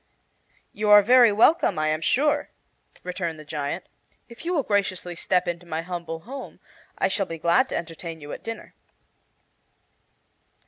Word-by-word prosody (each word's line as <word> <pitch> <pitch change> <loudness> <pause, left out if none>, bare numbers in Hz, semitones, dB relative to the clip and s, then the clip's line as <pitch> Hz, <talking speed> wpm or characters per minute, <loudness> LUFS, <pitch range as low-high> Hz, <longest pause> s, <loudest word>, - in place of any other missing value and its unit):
"You 210 +1 -1
are 210 0 +9
very 245 +1 +6
welcome, 230 - +4
I 155 0 +1
am 155 +1 -1
sure," 290 - +1 0.5
returned 175 -3 -4
the 155 - -11
giant. 145 -1 -4 0.4
"If 235 +3 -11
you 350 - -1
will 310 -6 +1
graciously 195 -4 -1
step 180 +1 0
into 175 0 -4
my 160 0 -3
humble 170 -2 -5
home 265 +8 -9 0.4
I - - +2
shall 195 +1 -1
be 165 - -6
glad 170 +2 +2
to - - -3
entertain 165 0 -7
you 145 -1 -9
at - - -8
dinner." 225 -1 -7
180 Hz, 155 wpm, -25 LUFS, 165-215 Hz, 0.5 s, are